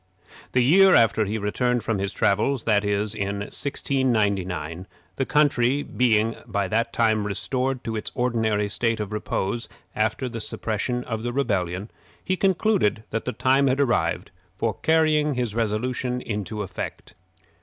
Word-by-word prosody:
The 125 - +4
year 190 +8 +6
after 110 -2 +4
he 105 +2 -2
returned 120 +4 0
from 110 -4 -1
his 100 0 -2
travels 110 +5 +1
that 105 -2 +2
is, 105 +1 0
in 100 -1 -3
1699, 100 - -1 0.3
the 135 - -1
country 145 -2 +2
being 115 -2 +1
by 100 -2 -1
that 115 +2 0
time 110 -3 +1
restored 130 +5 -1
to 115 - -3
its 105 - -4
ordinary 110 -4 +1
state 115 +2 0
of 105 0 -4
repose 105 +1 -2 0.3
after 110 +4 0
the 115 -2 -5
suppression 115 +4 -2
of 110 -3 -4
the 120 +1 -2
rebellion 100 -7 -1 0.3
he 185 - 0
concluded 190 - +1
that 115 - -2
the 125 - -1
time 135 +2 +2
had 130 +1 +1
arrived 90 -10 0 0.2
for 110 +2 -1
carrying 155 -2 +3
his 120 -4 -2
resolution 120 +3 -1
into 105 -2 -4
effect. 95 - -7
115 Hz, 150 wpm, -24 LUFS, 105-130 Hz, 0.3 s, year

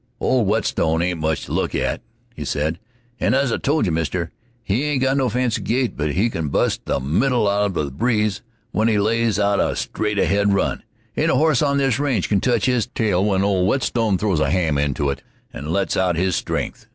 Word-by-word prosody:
"Old 125 -5 +1
Whetstone 85 -6 +1
ain't 90 -2 -1
much 80 -1 -1
to - - -10
look - - -1
at," - - -1 0.3
he - - -6
said, 80 +3 -2 0.4
"and - - +2
as 135 -2 +1
I - - 0
told 150 -2 +1
you, 90 - 0
Mister, 85 +1 -2 0.3
he 110 +6 0
ain't 145 -3 0
got 135 0 +2
no 135 -3 +1
fancy 125 0 0
gait; 125 +2 0
but 75 -1 -2
he 100 +6 +2
can 80 -6 -3
bust 70 - 0
the - - 0
middle 105 - +1
out 100 +1 +2
of 95 - -4
the 75 -3 -2
breeze 105 - 0 0.3
when 110 +1 +1
he 110 -2 +2
lays 110 +1 +1
out 100 -1 +2
a - - +1
straight 105 -1 -2
ahead 100 0 +2
run. - - 0 0.3
Ain't - - +1
a - - +3
horse 155 -4 +3
on 140 -2 +2
this 135 -2 +1
range 135 -10 0
can 100 -2 +2
touch 120 -5 +1
his 125 -3 +1
tail 105 -7 0
when 100 -2 +1
old 95 -2 +2
Whetstone 115 -3 +1
throws 95 -5 0
a 80 - +1
ham 80 -6 +1
into 70 0 0
it 70 - -6 0.3
and 75 +2 -7
lets 100 +2 0
out 90 -2 +1
his 90 +1 +1
stren'th." - - -3
100 Hz, 220 wpm, -21 LUFS, 85-120 Hz, 0.4 s, a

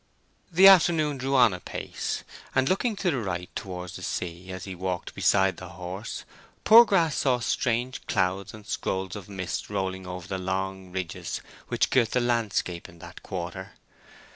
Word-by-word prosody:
The 185 +3 +8
afternoon 160 -6 +5
drew 135 +2 0
on 120 -6 +6
apace, 90 - -4 0.3
and, 130 0 +3
looking 210 - +1
to 190 -3 0
the 135 - -1
right 90 -4 -4
towards 90 -2 -6
the - - -10
sea 90 +1 -4
as 95 0 -6
he 95 - -6
walked 90 -1 -4
beside - - +3
the - - -8
horse, 95 +5 -6 0.4
Poorgrass 200 -9 +7
saw 130 -3 +2
strange 120 +2 -1
clouds 95 +1 0
and 110 -1 -12
scrolls 95 0 -2
of 105 -2 -9
mist 95 -3 -4
rolling 95 -2 -3
over 90 -1 -6
the 95 0 -3
long 95 0 -3
ridges 95 -3 -4 0.3
which - - +1
girt 120 -4 +3
the 125 - +3
landscape 115 -7 -1
in 85 - -16
that - - -11
quarter. 95 +1 -6
95 Hz, 165 wpm, -27 LUFS, 90-130 Hz, 0.4 s, The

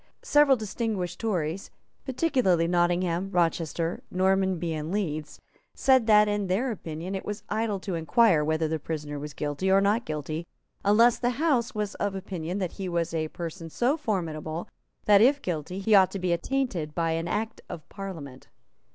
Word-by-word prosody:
Several 290 -3 +5
distinguished 215 -4 -3
Tories, 185 -5 -2 0.4
particularly 250 - +2
Nottingham, 175 +1 +1
Rochester, 170 -1 0
Normanby 190 -2 +1
and 155 +1 -4
Leeds, 155 -7 -3 0.4
said 260 -4 +4
that, 210 -1 +6
in 205 -1 -1
their 225 +8 0
opinion, 170 -2 -6
it 190 - -3
was 210 0 -5
idle 215 -2 -1
to 190 - -4
inquire 170 0 +3
whether 160 +1 0
the 160 0 -2
prisoner 150 -1 -5
was 145 -1 -7
guilty 150 +6 -2
or 190 +1 +6
not 205 +4 +2
guilty, 155 +1 -4 0.4
unless 225 +4 +5
the 245 -1 0
House 255 -6 +1
was 210 -1 -2
of 200 -1 0
opinion 185 -2 -4
that 185 -4 -2
he 190 -2 -5
was 170 -1 -1
a 160 -1 -1
person 165 +1 -7
so 245 - +1
formidable 165 - -3 0.4
that, 205 -1 +6
if 275 +5 +5
guilty, 175 - -4
he 200 +3 +1
ought 190 -2 +7
to - - -5
be 180 -2 0
attainted 175 - -2
by 165 -1 +1
Act 190 +7 -3
of 155 -3 -8
Parliament. 165 -10 -8
185 Hz, 165 wpm, -27 LUFS, 165-210 Hz, 0.4 s, ought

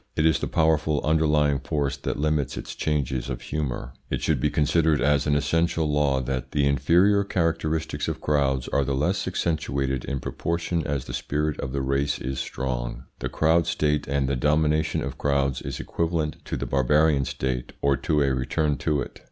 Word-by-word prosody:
It 80 - +2
is 80 - +4
the - - -2
powerful 80 -2 +2
underlying 75 -2 +3
force 70 -2 -1
that 70 - -4
limits 75 -3 0
its - - -6
changes 70 -4 -1
of 65 - -3
humour. 65 -5 -4 0.2
It - - -2
should 75 -5 +1
be 75 - +2
considered 75 +1 +2
as 70 +3 +2
an 75 - +3
essential 80 +2 +1
law 70 -2 +2
that 65 0 -4
THE 70 -1 +2
INFERIOR 90 +9 +4
CHARACTERISTICS 80 -3 -1
OF - - -3
CROWDS 70 -4 +1
ARE 70 - +2
THE 70 0 -1
LESS 90 +8 0
ACCENTUATED 70 -7 -1
IN 70 0 -2
PROPORTION 85 +3 -2
AS 70 -3 -2
THE - - -7
SPIRIT 75 +1 -2
OF 65 - -3
THE 70 0 -2
RACE 70 +2 0
IS 65 +1 -4
STRONG. 65 -2 -3 0.2
The - - -3
crowd 80 +1 +2
state 75 -1 0
and 70 -1 0
the 70 - 0
domination 75 +3 +1
of - - -5
crowds 70 -2 +1
is - - -5
equivalent 80 -2 -1
to - - -3
the - - -3
barbarian 70 +2 +3
state, 65 -1 -3
or 70 0 +4
to 75 +3 +1
a 70 -1 +1
return 70 +3 0
to 75 +2 0
it. - - -7
75 Hz, 185 wpm, -25 LUFS, 65-80 Hz, 0.2 s, is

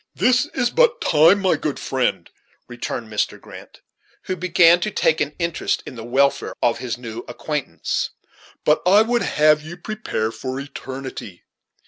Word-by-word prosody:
"This 255 +3 +3
is 245 -2 +1
but - - +3
time, 160 +6 +5
my 190 - +3
good 150 -3 -3
friend," 130 -2 -1 0.4
returned 120 -1 -5
Mr. 105 -1 -2
Grant, - - -13 0.4
who 185 - -3
began 175 -1 +5
to 195 - -1
take 160 -5 +1
an 150 0 -2
interest 170 -2 -1
in - - -8
the 115 -2 -8
welfare 140 +4 +1
of 115 - +1
his 120 -2 -4
new 115 -2 -7
acquaintance, - - -3 0.6
"but 150 - +3
I 200 +5 +6
would 240 +1 0
have 150 0 +3
you 165 +3 -9
prepare 180 - -3
for 130 +4 -5
eternity. 135 -8 -8
150 Hz, 155 wpm, -21 LUFS, 130-185 Hz, 0.6 s, I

